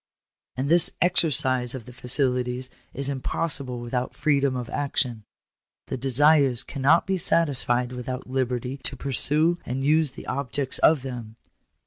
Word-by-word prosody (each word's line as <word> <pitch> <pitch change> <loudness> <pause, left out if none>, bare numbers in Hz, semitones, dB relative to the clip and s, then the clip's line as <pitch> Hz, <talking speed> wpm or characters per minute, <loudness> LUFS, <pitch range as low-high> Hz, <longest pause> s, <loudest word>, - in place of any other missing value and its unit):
"And 130 +2 -2
this 170 +3 +5
exercise 130 -8 +1
of 120 -4 -8
the 125 - -12
faculties 125 0 0 0.2
is 140 0 -3
impossible 135 -1 -2
without 125 +1 -4
freedom 140 -3 +1
of 125 -2 -4
action. 125 -5 -2 0.6
The - - -2
desires 135 0 +3
cannot 145 +4 +2
be 190 -1 -1
satisfied 125 -7 +2
without 125 +1 -6
liberty 130 0 -2
to 135 0 -6
pursue 150 +6 +2
and 130 +2 -4
use 155 -1 +2
the - - -11
objects 135 0 -1
of 155 -5 +4
them." 120 -4 -7
130 Hz, 135 wpm, -24 LUFS, 125-145 Hz, 0.6 s, this